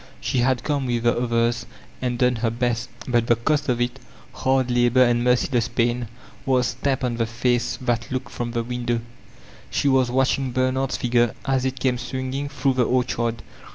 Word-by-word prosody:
She 130 - -1
had 125 0 +1
come 140 -3 -1
with 120 -1 -1
the 120 - +3
others 120 -1 0 0.3
and 125 -1 -1
done 125 0 +2
her 115 0 0
best, 120 +1 -1 0.2
but 120 -2 +1
the 120 - +5
cost 145 +5 0
of 120 -1 +1
it, 120 +2 -1 0.3
hard 130 -1 +1
labor 120 +1 +4
and 120 -1 +2
merciless 125 -1 +2
pain, 120 0 0 0.4
was 125 -2 +1
stanqwd 135 -2 0
on 120 -2 -1
the 115 -1 0
face 120 +1 0
that 120 -2 -1
looked 130 0 -3
from 120 -1 -3
the 120 -1 0
window. 120 -1 -2 0.7
She - - 0
was 130 -2 +3
watching 130 0 +1
Bernard's 130 +1 0
figure 120 -1 +1
as 130 -1 +1
it 130 0 -2
came 125 -1 +1
swinging 130 +2 -3
through 135 -1 0
tile 125 -1 +2
orchard. 120 -2 0
125 Hz, 185 wpm, -23 LUFS, 120-130 Hz, 0.7 s, the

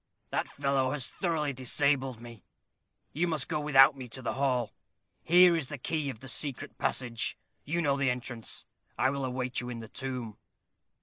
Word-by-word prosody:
"That - - -1
fellow 140 -2 0
has 145 -4 0
thoroughly 155 -5 -1
disabled 130 0 +1
me. 120 -3 -11 0.7
You 170 +4 +1
must 160 -3 0
go - - -1
without 145 -1 +6
me 130 -2 -8
to 130 +3 -4
the 115 - -1
hall. 125 -4 0 0.5
Here 175 +1 +6
is 160 -5 -1
the 145 - -6
key 150 +2 -2
of 110 -5 -7
the 130 - -9
secret 135 0 -1
passage. 115 -3 0 0.3
You 170 +4 0
know 140 -2 +2
the 140 -1 +1
entrance. 125 -2 -4 0.3
I 130 - +3
will 140 -1 -3
await 125 -1 -2
you 120 - -6
in 120 - -5
the 115 - -8
tomb." 125 -4 -5
135 Hz, 180 wpm, -30 LUFS, 125-145 Hz, 0.7 s, without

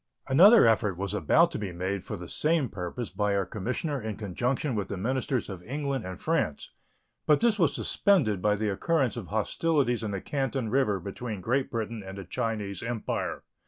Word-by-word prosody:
Another 195 - +8
effort 105 -4 +2
was 100 +1 -2
about 95 -8 +4
to - - -4
be 100 -3 -4
made 95 +2 -3
for - - -5
the 90 0 -8
same 155 - +1
purpose 100 +5 -5
by 105 -1 0
our 100 -1 +1
commissioner 125 - -3
in 110 -1 -4
conjunction 120 - -1
with 100 -4 -2
the 100 - -4
ministers 130 +4 -1
of 95 -4 -7
England 135 +2 -3
and 95 - -7
France, 155 - -1 0.6
but 150 - +5
this 230 -3 +2
was 165 -5 +3
suspended 130 - +2
by 105 +1 +3
the 105 +1 -1
occurrence 135 - +1
of 115 -7 -6
hostilities 125 +3 +1
in 110 - -3
the 100 -1 -3
Canton 135 -1 -2
River 110 -5 +2
between 100 +4 -5
Great 130 +7 0
Britain 115 -1 -3
and 95 0 -8
the 100 - -7
Chinese 100 -1 -3
Empire. 115 -1 -3
110 Hz, 190 wpm, -28 LUFS, 100-135 Hz, 0.6 s, Another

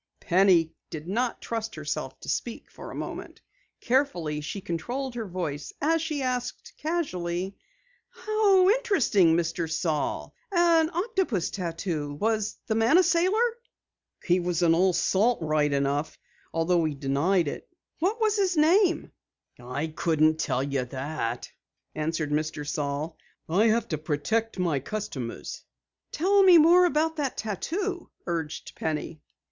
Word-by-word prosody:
Penny 175 -3 +3 0.2
did 155 0 -7
not 235 +5 -1
trust 225 -1 -4
herself 150 -3 -4
to - - -11
speak 235 - -3
for - - -10
a - - -8
moment. - - -6 0.4
Carefully 180 - 0
she 155 +7 -5
controlled 240 +10 -4
her 230 -3 -4
voice 160 -6 -4
as 325 +3 +2
she 310 -3 -2
said 250 -1 -1 0.3
casually: 190 - -2 0.5
"How 410 -4 +3
interesting, 280 - +3
Mr. 165 -1 -2
Saal, 160 -2 -1 0.2
An 340 -3 +4
octopus 355 - -1
tattoo! 165 -5 -3
Was 215 +4 -1
the 225 - 0
man 225 +8 +4
a 370 - +6
sailor?" 375 +7 +2 0.7
"He 180 0 +3
was 175 -1 -1
an 165 -1 +5
old 180 +1 +3
salt 225 +5 +2
all 160 - -4
right, 150 -1 +2
though 155 +4 -1
he 155 -2 -2
denied 145 +6 +1
it." - - -6 0.3
"What 385 +7 +1
is 430 -1 +2
his 380 -4 +1
name?" 350 +4 +3 0.5
"I 125 +5 -3
couldn't 155 0 +1
tell 130 -4 0
you 140 -2 -1
that," 130 -2 -4 0.5
answered 155 -1 -2
Mr. 150 -1 -2
Saal. 150 +2 -2 0.3
"I 195 +8 +3
have 230 +1 +2
to 155 - -2
protect 165 +10 -1
my 170 -6 +1
customers." 140 - -5 0.5
"Tell 395 +5 +3
me 370 -3 +8
more 345 +3 +7
about 320 -1 +1
the 280 -4 0
tattoo," 350 - -3 0.2
urged 165 -3 -4
Penny. 155 0 -4
185 Hz, 140 wpm, -27 LUFS, -, 0.7 s, me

